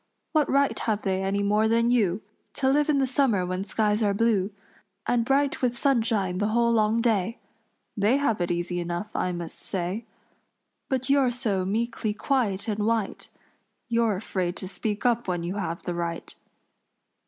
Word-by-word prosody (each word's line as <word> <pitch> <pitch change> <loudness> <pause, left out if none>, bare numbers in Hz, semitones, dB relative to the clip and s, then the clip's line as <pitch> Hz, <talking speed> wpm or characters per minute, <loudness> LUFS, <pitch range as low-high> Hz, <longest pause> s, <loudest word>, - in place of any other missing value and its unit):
What 310 -3 +2
right 280 0 +2
have 215 -2 -1
they 190 -1 0
any 195 +1 0
more 210 +2 +3
than 230 +1 +3
you, 205 -5 +2 0.3
To 265 - 0
live 295 +2 +2
in 295 - +3
the 270 - +3
summer 250 -8 +2
when 185 +1 -2
skies 210 +1 0
are 205 -2 +2
blue 205 -3 +2 0.6
And 240 -1 +2
bright 275 +3 +1
with 245 -2 0
sunshine 225 -9 +1
the 205 - +1
whole 235 +2 +2
long 220 0 +2
day? 225 -1 +1 0.6
They 210 +6 +3
have 230 -9 0
it 175 - 0
easy 175 +1 -1
enough, 175 +4 -4
I 180 - 0
must 170 -2 -6
say; 190 +4 -3 0.8
But 260 -1 -1
you're 275 -2 +4
so 220 -7 -1
meekly 215 +1 -1
quiet 220 -5 0
and 210 -1 -1
white, 225 -3 -1 0.6
You're 230 -3 +2
afraid 185 -2 -2
to 190 - -6
speak 210 +3 -4
up 240 -2 +2
when 175 -2 -1
you 180 +4 -3
have 170 -4 -3
the 175 - -3
right." 170 -1 -4
215 Hz, 175 wpm, -26 LUFS, 190-235 Hz, 0.8 s, you're